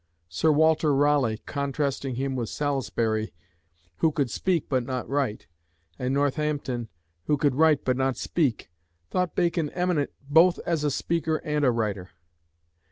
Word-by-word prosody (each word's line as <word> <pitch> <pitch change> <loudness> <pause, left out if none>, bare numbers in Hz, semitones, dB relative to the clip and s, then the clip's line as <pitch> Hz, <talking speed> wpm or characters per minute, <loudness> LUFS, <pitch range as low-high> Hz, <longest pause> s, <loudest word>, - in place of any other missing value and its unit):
Sir 155 - +2
Walter 155 -1 +3
Raleigh, 140 -6 +2
contrasting 140 -2 -2
him 135 +1 -2
with 120 -3 -3
Salisbury, 115 -7 -1 0.6
who 160 - +2
could 140 -6 -1
speak 175 +2 0
but 130 -3 0
not 125 0 -4
write, 135 -6 -1 0.5
and 125 +1 -1
Northampton, 140 -4 -1 0.4
who 150 - +2
could 140 -1 +2
write 155 +1 +3
but 130 -1 +1
not 135 -1 0
speak, 140 - -1 0.4
thought 180 -2 -1
Bacon 170 -3 +1
eminent 180 -4 0 0.2
both 165 +5 +5
as 165 -3 0
a 150 - +2
speaker 160 +2 -1
and 150 -1 0
a 130 - +5
writer. 105 -6 -2
140 Hz, 145 wpm, -26 LUFS, 125-155 Hz, 0.6 s, both